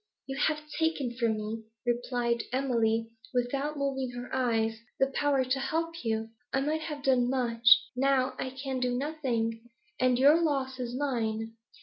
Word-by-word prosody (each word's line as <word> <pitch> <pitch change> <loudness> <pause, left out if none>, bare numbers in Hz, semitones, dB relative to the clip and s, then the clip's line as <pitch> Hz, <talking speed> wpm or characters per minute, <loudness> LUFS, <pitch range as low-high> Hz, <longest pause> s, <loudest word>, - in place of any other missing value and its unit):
'You 270 - -5
have 305 -1 -2
taken 320 -7 0
from 230 -3 +1
me,' 220 +1 -5 0.2
replied 240 -1 0
Emily, 230 -4 +1 0.2
without 275 +5 0
moving 270 -2 -1
her 245 0 -7
eyes, 225 -3 +1 0.2
'the 270 0 +3
power 280 -2 +2
to 260 +1 0
help 330 +4 -2
you. 225 -1 -1 0.2
I 270 - +2
might 305 +3 0
have 300 -3 -5
done 250 -2 +3
much, 235 -2 +5 0.2
now 265 0 +2
I 260 - -2
can 265 0 -4
do 250 -1 0
nothing; 250 -6 -1 0.4
and 255 -1 +3
your 290 +6 +6
loss 270 -5 0
is 245 -1 -3
mine.' 225 -5 -1
255 Hz, 155 wpm, -29 LUFS, 235-275 Hz, 0.4 s, your